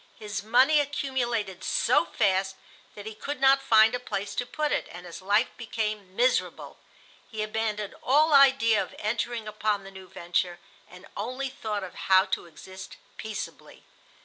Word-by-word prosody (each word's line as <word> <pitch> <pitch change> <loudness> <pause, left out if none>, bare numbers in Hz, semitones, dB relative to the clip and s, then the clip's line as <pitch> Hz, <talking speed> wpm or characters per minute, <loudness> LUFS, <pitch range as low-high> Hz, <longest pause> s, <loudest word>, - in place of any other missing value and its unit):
His 210 -2 -5
money 255 +8 +4
accumulated 240 -9 -2
so - - +2
fast 190 -1 0 0.4
that 205 - -9
he 220 - -6
could 280 +6 -6
not 270 0 +5
find 225 -3 +5
a 245 - -1
place 205 -4 -4
to 245 - -3
put 300 +1 -2
it, - - -1
and 175 +1 -10
his 175 +1 -9
life 205 +5 +2
became 210 -4 -4
miserable. 250 +3 0 0.5
He 220 -2 -3
abandoned 215 -1 -3
all 305 +2 +3
idea 265 -6 +5
of - - -7
entering 230 +1 -2
upon 210 -1 -1
the 195 - -11
new 190 -1 -12
venture, 175 -1 -2 0.3
and 180 +1 -14
only 255 +6 -3
thought 215 -6 -4
of 185 - -8 0.2
how 190 0 +6
to - - -2
exist 190 +3 -11 0.2
peaceably. 220 -2 -7
215 Hz, 160 wpm, -27 LUFS, 195-250 Hz, 0.5 s, how